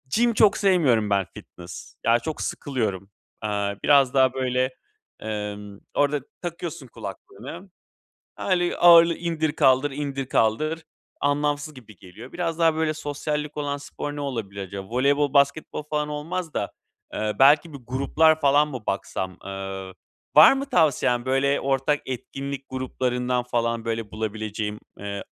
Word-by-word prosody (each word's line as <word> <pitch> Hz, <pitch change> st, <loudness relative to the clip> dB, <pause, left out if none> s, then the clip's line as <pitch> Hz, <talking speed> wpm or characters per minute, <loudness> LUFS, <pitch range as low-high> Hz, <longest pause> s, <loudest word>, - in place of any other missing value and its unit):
gym 235 Hz, +1 st, +3 dB
çok 215 Hz, -1 st, +4 dB
sevmiyorum 145 Hz, -, +3 dB
ben, 100 Hz, -2 st, +2 dB
fitness. 85 Hz, 0 st, -11 dB
Ya, 115 Hz, +1 st, +4 dB
çok 150 Hz, +6 st, -5 dB
sıkılıyorum. 105 Hz, -9 st, -3 dB, 0.3 s
Iıı, 100 Hz, -1 st, -2 dB
biraz 140 Hz, -3 st, +5 dB
daha, 130 Hz, -2 st, +4 dB
böyle, 130 Hz, -1 st, 0 dB, 0.5 s
ımm, 105 Hz, -1 st, -5 dB
orada 145 Hz, 0 st, +1 dB, 0.2 s
takıyorsun 170 Hz, -4 st, -6 dB
kulaklığını, 115 Hz, -, -9 dB, 0.7 s
öyle 175 Hz, -2 st, 0 dB
ağırlığı 170 Hz, -1 st, +7 dB
indir 165 Hz, -3 st, -1 dB
kaldır, 135 Hz, -1 st, +3 dB
indir 140 Hz, -1 st, -3 dB
kaldır. 155 Hz, +9 st, +1 dB, 0.4 s
Anlamsız 145 Hz, +1 st, 0 dB
gibi 115 Hz, -6 st, -14 dB
geliyor. 95 Hz, +8 st, -13 dB
Biraz 170 Hz, -2 st, -3 dB
daha, 165 Hz, -1 st, +4 dB
böyle, 160 Hz, -1 st, 0 dB
sosyallik 150 Hz, 0 st, -4 dB
olan 145 Hz, -1 st, -2 dB
spor 145 Hz, +1 st, -6 dB
ne 145 Hz, -, -4 dB
olabilir 110 Hz, -8 st, -4 dB
acaba? 95 Hz, 0 st, -8 dB
Voleybol, 140 Hz, +3 st, +2 dB
basketbol 140 Hz, +2 st, +1 dB
falan 150 Hz, 0 st, -2 dB
olmaz 160 Hz, +3 st, -4 dB
da, 100 Hz, -, -2 dB, 0.4 s
eee, 105 Hz, 0 st, -1 dB
belki 150 Hz, +4 st, +5 dB
bir -, -, -6 dB
gruplar 155 Hz, +5 st, +3 dB
falan 145 Hz, +1 st, +4 dB
mı 130 Hz, -6 st, -7 dB
baksam? 95 Hz, -1 st, -3 dB
Iıı, 95 Hz, -1 st, -6 dB, 0.4 s
var 155 Hz, -, +9 dB
mı 275 Hz, 0 st, -2 dB
tavsiyen? 135 Hz, -7 st, +2 dB
Böyle, 135 Hz, +2 st, +2 dB
ortak 135 Hz, +2 st, +1 dB
etkinlik 135 Hz, +2 st, -5 dB
gruplarından 125 Hz, -1 st, -1 dB
falan, 115 Hz, -2 st, -1 dB
böyle, 115 Hz, -2 st, -3 dB
bulabileceğim, 110 Hz, -1 st, -4 dB, 0.2 s
eee, 100 Hz, 0 st, -5 dB
135 Hz, 135 wpm, -24 LUFS, 110-150 Hz, 0.7 s, var